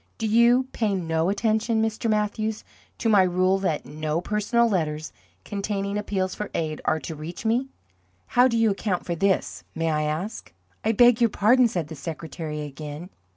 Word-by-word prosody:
"Do 225 - -3
you 235 +3 +5
pay 210 -4 0
no 165 -1 0
attention, 220 +2 +1
Mr. 220 +1 -1
Mathews, 215 0 -1 0.3
to - - -1
my 210 -3 +6
rule 185 +1 +2
that 180 -6 -1
NO 155 +1 -2
personal 210 +5 +1
letters 155 -6 -2 0.3
containing 200 0 -3
appeals 195 -2 -1
for 210 - -5
aid 155 -2 -2
are 155 0 +2
to 165 - -6
reach 155 +7 -8
me? 240 +4 +1 0.6
How 245 +1 +4
do 230 -2 0
you 225 -2 +3
account 195 -2 -2
for 175 - -2
this, 165 - 0
may 165 0 0
I 150 0 +1
ask?" 155 - -3 0.3
"I 220 - +2
beg 240 +1 +5
your 235 - +5
pardon," 240 +5 +4
said 175 -8 -3
the 160 - -8
secretary 155 0 -6
again. 150 +4 -7
195 Hz, 175 wpm, -25 LUFS, 160-220 Hz, 0.6 s, my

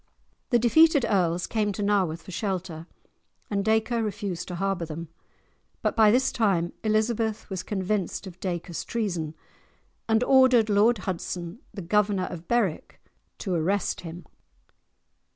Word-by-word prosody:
The 245 - +4
defeated 285 +4 +5
earls 180 -3 +1
came 210 -2 0
to 205 - -3
Nawarth 185 -5 +1
for - - -10
shelter, 180 -4 -4 0.6
and 200 -1 0
Dacre 220 +2 +1
refused 200 -5 -3
to 180 - -5
harbour 195 -1 -1
them. 165 0 -6 0.7
But - - +1
by 220 -2 +6
this 260 +4 +3
time 190 -7 +1
Elizabeth 220 0 0
was 190 -2 -2
convinced 200 0 -2
of 185 -1 -10
Dacre's 175 -2 -4
treason, 175 -9 -3 0.7
and 220 +2 +3
ordered 255 -4 +5
Lord 215 +4 +4
Hudson, 175 +1 -4
the 195 - -7
Governor 200 +1 +1
of 170 -1 -8
Berwick, 225 -9 -1 0.4
to 190 - -3
arrest 180 +4 0
him. 170 0 -9
200 Hz, 135 wpm, -26 LUFS, 175-220 Hz, 0.7 s, by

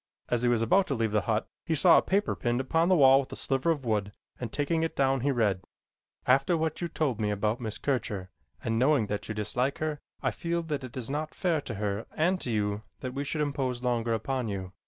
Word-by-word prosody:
As 120 -1 +1
he 125 - +2
was 120 -2 +3
about 185 - +3
to 140 - -1
leave 115 -2 0
the 105 0 +2
hut 110 0 +1 0.2
he 160 - 0
saw 170 +3 +7
a - - 0
paper 200 +2 0
pinned 120 0 0
upon 165 +6 +1
the 185 - +5
wall 135 -3 +7
with 135 - -5
a - - -5
sliver 135 +4 0
of 145 -5 0
wood 105 -3 0 0.3
and 120 - -4
taking 155 +3 0
it 165 - -1
down, 135 -1 +2
he 135 +4 0
read: 105 -7 +1 0.6
After 135 +6 +3
what 160 +1 -2
you 175 - 0
told 135 -9 -1
me 105 - +1
about 105 +3 0
Miss 110 -2 -4
Kircher, 105 -9 -2 0.3
and 115 0 0
knowing 130 -2 +4
that 105 +1 -4
you 110 - -3
dislike 125 +6 -1
her, 155 -1 -2 0.2
I - - +2
feel 170 0 -2
that 150 -4 -3
it 130 0 -8
is 125 +1 -4
not 155 +2 -3
fair 170 -5 +1
to 115 - -6
her 100 +1 -2
and 180 +4 +1
to - - -4
you 105 -2 0 0.2
that 130 -1 -4
we 140 +1 -2
should 150 +2 -2
impose 135 -4 -1
longer 120 -2 +1
upon 130 +1 -2
you. 95 -2 -5
130 Hz, 240 wpm, -29 LUFS, 110-150 Hz, 0.6 s, saw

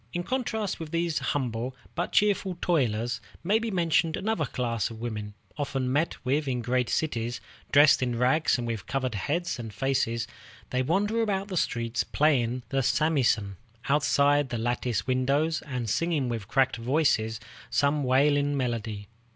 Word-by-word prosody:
In 175 - -2
contrast 220 -3 -2
with 160 -2 -6
these 170 0 0
humble 125 -2 -2 0.2
but 175 - -2
cheerful 195 -3 +2
toilers 120 -7 0 0.2
may 205 +6 +3
be 230 0 -3
mentioned 165 -3 +1
another 200 -9 -1
class 115 -5 -1
of 115 -1 -9
women, 105 -3 -5 0.2
often 135 -3 -1
met 160 +4 +1
with 140 +3 +1
in 130 -2 0
the - - -10
great 125 0 +1
cities. 120 -6 -1 0.3
Dressed 145 0 +6
in 120 -2 0
rags 130 +6 +3
and 120 - -3
with 115 -5 -4
covered 130 -2 -1
heads 150 - -2
and 115 -2 -6
faces, 115 -1 0 0.5
they 130 - +1
wander 205 - +1
about 200 -2 -1
the 185 - -4
streets 115 -5 0
playing 125 -5 +1
the 135 -1 +1
samisen 125 - +1 0.3
outside 145 -1 +3
the 120 - -2
latticed 120 -1 -1
windows, 140 +5 +1
and 125 -4 -3
singing 150 - 0
with 115 -4 -4
cracked 130 +1 +2
voices 115 -3 +1 0.3
some 145 +1 +2
wailing 145 +2 +3
melody. 115 -5 -3
135 Hz, 160 wpm, -27 LUFS, 120-155 Hz, 0.5 s, Dressed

